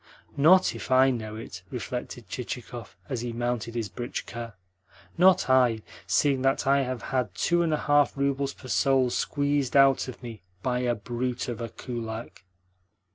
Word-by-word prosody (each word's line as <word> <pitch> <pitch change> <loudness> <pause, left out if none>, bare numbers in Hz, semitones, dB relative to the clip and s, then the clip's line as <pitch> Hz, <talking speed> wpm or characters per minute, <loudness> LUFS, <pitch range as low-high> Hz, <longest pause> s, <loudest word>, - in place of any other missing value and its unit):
"Not 175 +6 +5
if - - -8
I 130 +1 +5
know 110 -3 -4
it!" 100 -5 -8
reflected 120 0 -6
Chichikov 120 +1 -7
as 130 -5 -3
he 120 -1 -4
mounted 120 -1 -2
his 115 -3 -2
britchka. 115 0 -6 0.6
"Not 180 -6 +5
I, 125 -4 +3 0.2
seeing 140 -3 +2
that 135 +2 +1
I 140 +1 +4
have 130 -4 -3
had 120 -8 0
two 175 - +2
and 165 -2 +1
a 155 - +2
half 145 -1 +2
roubles 140 0 0
per 130 - -12
soul 130 0 +2
squeezed 145 -1 0
out 135 -1 +5
of 130 0 -9
me 115 -3 -8 0.2
by 125 -1 0
a 120 -1 0
brute 120 +3 -3
of 120 -1 -4
a 115 - -4
kulak!" 115 -3 -7
125 Hz, 165 wpm, -27 LUFS, 115-135 Hz, 0.6 s, Not